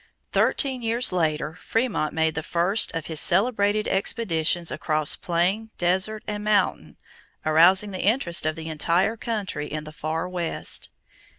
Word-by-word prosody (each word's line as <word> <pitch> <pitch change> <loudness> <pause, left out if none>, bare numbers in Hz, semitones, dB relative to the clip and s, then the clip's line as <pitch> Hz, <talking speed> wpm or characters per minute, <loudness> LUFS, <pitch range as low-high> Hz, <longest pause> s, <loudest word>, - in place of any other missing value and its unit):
Thirteen 265 -3 +1
years 235 +2 0
later 160 -1 -1
Frémont 225 -10 0
made 160 0 +1
the 160 - -3
first 175 +6 +1
of 165 -2 -3
his 160 -2 -1
celebrated 205 +2 +2
expeditions 175 -5 0
across 155 -1 0
plain, 185 +6 0
desert, 190 +5 0
and 210 0 -4
mountain, 210 -1 0 0.5
arousing 180 +6 +5
the 185 - -4
interest 190 - +2
of 155 - -1
the 160 -1 -7
entire 170 +7 +1
country 210 -10 -4
in 155 0 -4
the 155 - -9
Far 160 +3 -3
West. 175 -2 -4
180 Hz, 140 wpm, -24 LUFS, 160-210 Hz, 0.5 s, arousing